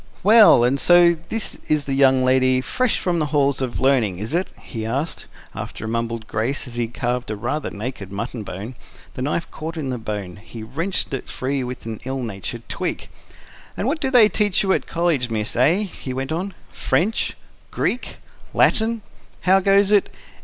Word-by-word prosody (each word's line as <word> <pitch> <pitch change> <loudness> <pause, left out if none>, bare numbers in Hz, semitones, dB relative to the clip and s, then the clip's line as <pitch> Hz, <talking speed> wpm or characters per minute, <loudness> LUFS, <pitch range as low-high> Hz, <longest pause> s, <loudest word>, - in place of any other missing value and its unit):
"Well, 210 - +7
and 130 +3 +2
so 175 +1 +6
this 225 -1 -2
is 150 -1 +2
the 135 - -2
young 130 -1 +4
lady 130 0 +3
fresh 245 - 0
from 175 -2 0
the 155 - 0
halls 140 -2 +1
of 130 -2 -3
learning, 125 -9 +2
is 110 - -4
it?" 180 +3 +1
he 115 -4 -6
asked, 135 +9 -3 0.3
after - - -6
a - - -4
mumbled 115 0 -2
grace, 115 +6 -2
as 125 - -8
he 120 -1 -1
carved 120 +1 -3
a 110 - -2
rather 120 +9 -3
naked 105 -2 -6
mutton 115 +3 -4
bone: 105 +4 -7 0.4
the - - -6
knife 150 +5 -2
caught 165 +2 -6
in 145 -4 -3
the 125 - -3
bone; 105 -5 -5
he 110 +2 -10
wrenched 165 - -3
it 135 - -4
free 135 +1 -2
with 125 -1 -6
an 110 -2 -6
ill 130 0 -3
natured 100 -5 -6
tweak. - - -4 0.7
"And - - -2
what 305 +4 0
do 265 - +1
they 245 -5 +7
teach 210 -2 +1
you 190 -1 +3
at - - -1
college, 165 -7 0
miss, 110 -1 -2
eh?" 160 - +3
he 135 -9 -6
went 135 +2 -3
on. 185 +5 -3 0.2
"French?... 210 +7 0 0.3
Greek?... 250 - -2 0.4
Latin? 225 0 +3 0.4
How 190 +1 +5
goes 195 +1 +4
it? 205 -1 +4
135 Hz, 190 wpm, -22 LUFS, 115-175 Hz, 0.7 s, Well